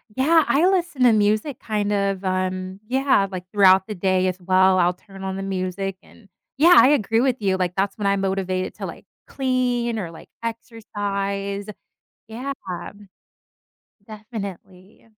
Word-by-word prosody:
yeah, 315 +4 +4
I 315 +6 +3
listen 350 -8 0
to 240 - +7
music 215 +6 +1
kinda, 205 -2 -1
um, 185 0 -2
yeah, 260 -6 +2
like, 180 -1 -7
throughout 190 -2 +5
the 210 - -5
day 185 0 +1
as 185 0 -2
well, 185 +1 +3
I'll 175 0 +3
turn 195 +1 -13
on 190 0 -3
the - - -4
music, 195 0 -3
and 200 -4 -20 0.3
yeah, 345 +3 +7
I 260 - +8
agree 225 -4 +2
with 260 -3 0
you 190 -2 +1
like, 180 -1 -1
that's 195 +1 -1
when 210 - -4
I'm 200 0 +2
motivated 190 -1 -2
to, - - -6
like, - - -9 0.2
clean 250 -3 -1
or 175 -6 -4
like 165 - -14
exercise, 200 -3 -4 0.6
yeah. 250 +5 -5 1.6
Definitely. 200 -2 -9
200 Hz, 150 wpm, -22 LUFS, 190-230 Hz, 1.6 s, I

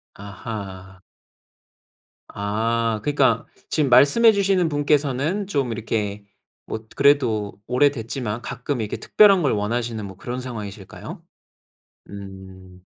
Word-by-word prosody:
아하. 100 -2 -8 1.3
아 110 +2 -1
그니까 130 -6 +2 0.2
지금 150 -4 +1
말씀해 145 - +6
주시는 195 -4 +2
분께서는 145 +5 0
좀 140 - -1
이렇게 105 -2 -3 0.4
뭣 110 0 -6
그래도 115 -8 +2
오래됐지만 125 -3 0
가끔 125 0 -3
이렇게 105 - -3
특별한 200 -3 +5
걸 140 - +2
원하시는 115 +1 -2
뭐 95 -1 -9
그런 125 +3 -5
상황이실까요? 105 -6 -8 0.9
음. 95 -2 -11
115 Hz, 250 characters per minute, -22 LUFS, 100-140 Hz, 1.3 s, 말씀해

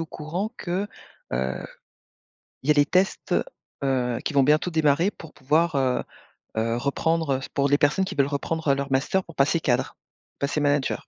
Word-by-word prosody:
au 165 - -6
courant 170 +8 -4
que, 190 +3 -2 0.4
heu, 65 +1 -2 1.0
il 135 - -9
y - - +8
a - - +7
les 145 0 +5
tests, 185 +5 +1 0.5
heu, 125 -3 0
qui - - -2
vont 140 -1 +5
bientôt 150 +5 +3
démarrer 160 +3 +3
pour 165 -5 -13
pouvoir, 155 +4 +1
heu 130 -2 +1 0.5
heu, 115 +1 0
reprendre, 150 +3 0
heu, - - -4
s - - -7
pour 140 0 0
les 145 - +4
personnes 150 +7 +3
qui - - -5
veulent 140 -1 +3
reprendre 150 +1 -1
leur 140 0 -4
master 140 +8 +1
pour 165 - -13
passer 145 +4 +3
cadre, 125 -5 0 0.4
passer 140 +2 0
manager?» 145 -2 +1
145 Hz, 185 wpm, -25 LUFS, 135-165 Hz, 1.0 s, y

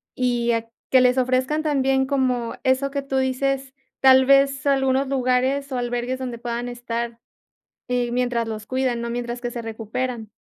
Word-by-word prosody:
y 240 -2 +1
a 230 0 -2 0.2
que 260 - +6
les 250 0 +4
ofrezcan 255 +4 +1
también 270 -3 +2
como 255 -4 0
eso 265 +1 +1
que 280 0 -2
tú 275 -1 -3
dices, 265 +1 -1 0.3
tal 265 0 +7
vez 275 0 +4
algunos 270 -1 +2
lugares 265 +1 +1
o - - -1
albergues 245 +1 -2
donde 250 -2 -4
puedan 240 +1 -3
estar, 235 -1 -4 0.7
eh, 245 -1 0
mientras 240 -2 0
los 215 0 -6
cuidan, 255 -2 0
¿no?, 235 - -3
mientras 240 0 -4
que 240 - -2
se 235 -1 -5
recuperan. 225 +1 -4
255 Hz, 165 wpm, -23 LUFS, 240-265 Hz, 0.7 s, tal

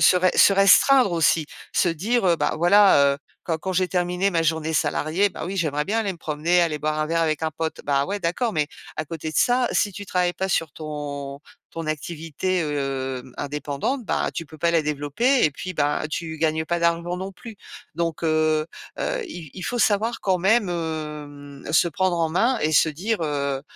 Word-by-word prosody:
se 180 - +6
ré 185 0 +3
se 200 - +6
restreindre 200 +3 +5
aussi, 165 -1 +3 0.3
se 175 - +3
dire: 205 +7 0
«Heu, 170 - +4
bah, - - 0
voilà, 175 -5 +5
heu, - - -10 0.3
quand 165 -2 -1
quand 190 +3 -4
j'ai 185 0 +2
terminé 180 +2 0
ma 165 -2 +1
journée 160 0 0
salariée, 160 +5 +1
bah 180 - -7
oui, 195 +1 -4
j'aimerais 150 -4 0
bien 220 +3 -1
aller 200 -3 -2
me 175 - -13
promener, 165 +3 +1
aller 155 -3 -1
boire 155 +1 -1
un 155 - 0
verre 165 +1 0
avec 155 -1 -1
un 160 - 0
pote». 160 +1 -4
Bah, 140 -1 +1
ouais, 200 +1 -2
d'accord, 200 +6 -1
mais 150 -2 +1 0.3
à 155 - -2
côté 160 0 -6
de - - -6
ça, 245 0 +3
si 205 -2 +1
tu 200 +1 -8
travailles 180 -1 +1
pas 190 +2 -3
sur 165 -4 0
ton 145 -2 -6 0.3
ton 165 -1 -6
activité, 165 +4 -3
hem, 135 -4 -3
indépendante, 145 - -3
ben, - - 0
tu 165 - -4
peux 155 +2 -13
pas 170 +2 +2
la 165 -1 +3
développer. 150 - +1
Et 155 - +3
puis, 185 +5 -7
bah, 145 +1 0
tu 160 -1 -4
gagnes 160 0 0
pas 170 +2 -1
d'argent 170 +1 0
non 190 +1 -5
plus. 225 +2 -11 0.4
Donc, 165 -1 -2
heu 155 -1 +2 0.3
heu, - - -2
il 165 - -9
il 185 - -8
faut 245 - -2
savoir 225 +2 +1
quand 185 -2 +1
même, 205 +3 +3
hem, 150 -4 -6
se 160 - +4
prendre 185 +2 0
en 165 -1 +1
main 235 +9 +2
et 155 - 0
se 155 +1 +5
dire: 195 +9 -2
«Heu, 140 -3 -2
165 Hz, 210 wpm, -23 LUFS, 150-185 Hz, 0.4 s, se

